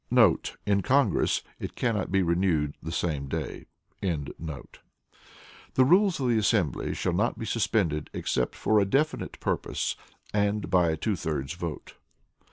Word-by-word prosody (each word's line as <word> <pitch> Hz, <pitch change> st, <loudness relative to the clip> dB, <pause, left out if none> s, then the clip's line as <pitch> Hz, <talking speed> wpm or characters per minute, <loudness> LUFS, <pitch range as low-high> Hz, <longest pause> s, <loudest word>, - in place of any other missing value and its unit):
* -, -, -10 dB
[In 100 Hz, -1 st, +2 dB
Congress, 130 Hz, -3 st, +2 dB, 0.2 s
it -, -, -6 dB
cannot 110 Hz, -7 st, -1 dB
be 95 Hz, 0 st, +3 dB
renewed 85 Hz, -4 st, +1 dB
the 80 Hz, -, -5 dB
same 75 Hz, -5 st, -1 dB
day.] -, -, -4 dB, 0.4 s
The 80 Hz, -3 st, -3 dB, 1.3 s
rules 180 Hz, +8 st, +5 dB
of 130 Hz, -, 0 dB
the 115 Hz, -2 st, +3 dB
assembly 100 Hz, -, +1 dB
shall -, -, -1 dB
not -, -, +1 dB
be -, -, -4 dB
suspended 75 Hz, -1 st, 0 dB
except 60 Hz, -, -1 dB
for 110 Hz, -1 st, +3 dB
a 100 Hz, -, +3 dB
definite 145 Hz, +10 st, 0 dB
purpose, -, -, -1 dB, 0.4 s
and 105 Hz, -3 st, 0 dB
by 90 Hz, -2 st, +4 dB
a 80 Hz, -, 0 dB
two 105 Hz, +6 st, 0 dB
thirds 75 Hz, -3 st, -3 dB
vote. 85 Hz, -3 st, -6 dB
95 Hz, 145 wpm, -27 LUFS, 80-110 Hz, 1.3 s, rules